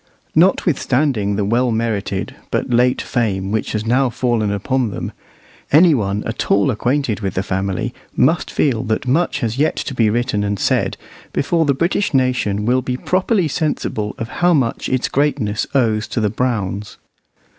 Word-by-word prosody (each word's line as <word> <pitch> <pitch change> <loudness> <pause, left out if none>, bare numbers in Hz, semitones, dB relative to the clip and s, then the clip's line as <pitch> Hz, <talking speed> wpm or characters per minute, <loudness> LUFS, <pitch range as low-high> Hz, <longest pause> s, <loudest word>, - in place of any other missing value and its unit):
Notwithstanding 140 - +2
the 100 0 0
well 120 +4 +2
merited 110 -4 -2
but - - -2
late 125 +1 +3
fame 100 -6 -1
which 110 0 -1
has 110 0 -2
now 125 +3 +2
fallen 115 -4 0
upon 120 +4 0
them, 100 - -5 0.6
any 160 +3 +6
one 105 -5 -1
at 115 - -4
all 100 +6 +3
acquainted 120 -1 0
with 95 -3 -3
the 95 - 0
family 95 -1 -2 0.2
must - - +2
feel 125 -7 +1
that 110 +3 -1
much 165 +7 +1
has 115 +2 -2
yet 155 - +2
to 140 - -4
be 115 -4 +2
written 115 -2 0
and 100 0 -1
said - - 0 0.4
before 165 +3 +1
the 140 -2 +2
British 170 +2 0
nation 125 -6 +1
will 125 +2 +2
be 125 0 -3
properly 185 - +1
sensible 130 -7 -2
of 115 - -4
how 175 -1 +5
much 125 -6 0
of - - +1
its 130 - -1
greatness 130 -7 0
it - - -18
owes 110 -4 +2
to - - -2
the 105 -2 +1
Browns. 105 -4 -2
120 Hz, 175 wpm, -19 LUFS, 105-135 Hz, 0.6 s, any